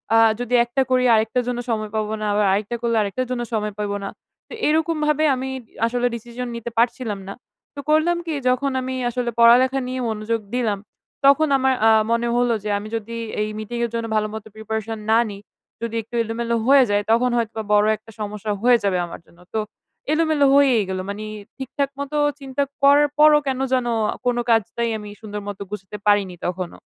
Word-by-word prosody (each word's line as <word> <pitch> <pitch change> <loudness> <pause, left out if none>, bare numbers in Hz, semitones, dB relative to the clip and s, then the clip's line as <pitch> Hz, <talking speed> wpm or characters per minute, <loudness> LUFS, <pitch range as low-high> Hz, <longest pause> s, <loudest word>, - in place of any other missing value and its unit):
আ - - +7 0.2
যদি 245 0 -4
একটা 265 +3 0
করি, 255 0 +3
আরেকটার 225 +3 +1
জন্য 245 -1 -2
সময় 215 -2 -2
পাবো 215 0 -1
না। - - -1
আবার 205 0 +2
আরেকটা 210 +4 -1
করলে, 230 -1 0
আরেকটার 235 +5 -2
জন্য 245 -1 -1
সময় 210 -1 -1
পাবো 205 -1 -2
না। 195 - -3 0.4
তো - - -11
এরকমভাবে 310 -1 +1
আমি 260 +1 -4 0.2
দি - - -32 0.2
আসলে 245 +1 0
ডিসিশন 240 +2 -6
নিতে 235 0 -5
পারছিলাম 235 -3 0
না। 195 - -5 0.4
তো - - -7
করলাম 320 +3 +3
কি? 320 - -2 0.2
যখন 270 +2 +1
আমি 260 0 -4
আসলে 245 0 -2
পড়ালেখা 255 +3 +6
নিয়ে 255 0 -3
মনোযোগ 220 +1 -2
দিলাম। 215 -5 0 0.5
তখন 280 +3 +6
আমার 265 0 +2
আ - - +7 0.2
মনে 235 0 +1
হলো 245 -1 +2
যে 210 - -3
আমি 210 +1 -6
যদি 230 +1 -5 0.3
এই 215 - -1
মিটিংয়ের 235 +2 -3
জন্য 230 0 -2
ভালো 215 0 +1
মতো 220 0 -7
প্রিপারেশন 220 0 -4
না 225 - +6
নিই, 200 0 -9 0.4
যদি 230 -1 -3
একটু 230 +2 -10
এলোমেলো 230 +1 -2
হয়ে 275 -1 +7
যায়, 205 0 +2
তখন 245 +2 +3
হয়তো 225 -1 -2
বড় 210 0 +5
একটা 220 +2 -16
সমস্যা 210 0 -4
হয়ে 245 -1 +6
যাবে 190 -2 +1
আমার 170 - -9
জন্য। 170 - -23
তো 220 - 0 0.5
এলোমেলো 310 -3 +2
হয়েই 260 -7 +5
গেলো। 185 0 -2
মানি 210 +1 -5 0.3
ঠিকঠাকমতো 280 +2 -3 0.2
চিন্তা 275 +1 -2 0.2
করার 290 +1 +6
পরও 300 0 +7
কেন 260 -1 -1
যেন 250 -2 +1 0.4
কোন 245 -1 +1
কাজটাই 230 +1 +1
আমি 210 -1 -9
সুন্দর 210 -1 -6
মত 200 -1 -6
গুছাতে 210 0 -7
পারিনি 200 -3 +3
তখনো। 180 0 -4
235 Hz, 190 wpm, -22 LUFS, 215-260 Hz, 0.5 s, আ